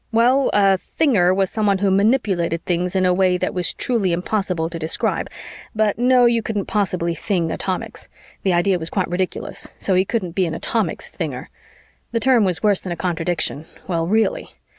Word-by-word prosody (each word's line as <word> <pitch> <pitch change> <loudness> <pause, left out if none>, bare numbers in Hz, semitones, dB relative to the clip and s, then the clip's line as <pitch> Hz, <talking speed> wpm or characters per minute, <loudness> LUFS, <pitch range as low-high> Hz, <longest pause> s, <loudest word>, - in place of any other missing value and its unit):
well, 245 +4 +3
a 195 -2 +3 0.2
thinger 205 - +4
was 190 0 +1
someone 210 -3 +1
who 195 0 +1
manipulated 190 -6 +1
things 180 +1 -1
in 185 -1 +2
a 180 - +3
way 180 0 +2
that 185 - -2
was 180 -1 +1
truly 220 -7 0
impossible 180 -2 -1
to 165 0 -7
describe, 160 0 -1 0.5
but 215 0 +1
no, 250 0 +5
you 235 -1 +3
couldn't 210 -3 -3
possibly 180 -5 -1
thing 170 -1 -1
atomics; 185 -1 -4 0.3
the 190 - +1
idea 180 +1 +2
was 160 0 -3
quite - - -1
ridiculous, 185 +1 -3
so 195 - -1
he 185 0 +4
couldn't 195 -3 -2
be 185 +1 0
an 160 - -4
atomics - - -2
thinger; - - -5 0.6
the 230 - +1
term 250 -2 +4
was 185 -1 0
worse 205 -3 +3
than 185 - -6
a - - -2
contradiction, 165 -2 -1 0.2
well, 165 -3 -1
really! 225 - 0
190 Hz, 185 wpm, -20 LUFS, 175-215 Hz, 0.6 s, no